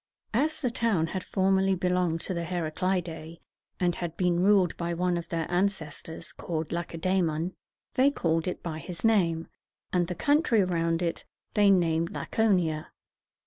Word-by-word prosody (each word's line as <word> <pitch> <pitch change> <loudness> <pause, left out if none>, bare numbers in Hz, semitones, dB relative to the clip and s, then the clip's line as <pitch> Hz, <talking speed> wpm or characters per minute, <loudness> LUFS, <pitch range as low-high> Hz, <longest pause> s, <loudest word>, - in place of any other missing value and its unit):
As 300 +8 +1
the 250 -4 0
town 225 -9 +1
had 190 - -2
formerly 190 0 +2
belonged 180 -2 0
to 190 - -3
the 170 -1 -2
Heraclidæ, 170 -1 -2 0.4
and 175 -1 +2
had 170 -1 -5
been 180 -2 +2
ruled 190 -2 +4
by 170 0 -2
one 180 +1 +1
of 170 -1 -4
their 165 -1 -1
ancestors, 175 -4 -2
called 160 -2 -4
Lac 170 0 -3
e - - -5
dæ´mon, 175 -1 0 0.4
they 265 +2 +5
called 165 - 0
it 180 - -4
by 160 -2 -4
his 175 0 -8
name, 170 -7 +2 0.5
and 175 -2 +2
the 180 - -4
country 285 - +3
around 165 -1 0
it 170 - -2 0.3
they 205 -1 +5
named 170 -3 +3
La - - -4
co´ni 190 -7 +2
a. 155 0 -6
175 Hz, 170 wpm, -28 LUFS, 165-190 Hz, 0.5 s, they